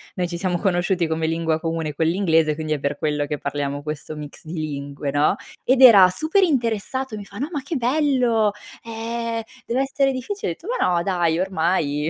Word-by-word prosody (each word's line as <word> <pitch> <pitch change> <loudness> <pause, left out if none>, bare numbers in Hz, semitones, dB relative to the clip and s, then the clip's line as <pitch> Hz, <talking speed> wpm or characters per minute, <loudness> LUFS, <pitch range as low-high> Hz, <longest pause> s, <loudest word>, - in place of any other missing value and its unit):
noi 180 -2 -1
ci 170 0 -5
siamo 180 -1 -1
conosciuti 175 -2 +1
come 160 0 -1
lingua 160 0 0
comune 165 -2 -3
quell'inglese, 165 -1 +2
quindi 155 0 -3
è 150 - -2
per 140 +1 -2
quello 150 -1 0
che 145 0 -4
parliamo 140 0 -3
questo 150 +1 -6
mix 150 -1 -9
di 160 - -8
lingue", 145 -3 -4
no. 145 +1 +2 0.3
Ed 260 +1 +3
era 205 -8 +9
super 315 - +1
interessato 260 - -1
e - - -6
mi 205 - -8
fa: 200 0 -12
"No 285 +6 -3
ma 290 -5 -3
che 300 +4 -4
bello. 250 -5 +2 0.3
Ehm, 230 0 -3 0.2
dev'essere 270 +2 +1
difficile." 260 - -3
Ho - - -2
detto: 345 - -14
"Ma 180 - +2
no 170 - +1
dai, 175 -3 +1
ormai 160 -5 0
175 Hz, 195 wpm, -22 LUFS, 155-235 Hz, 0.3 s, era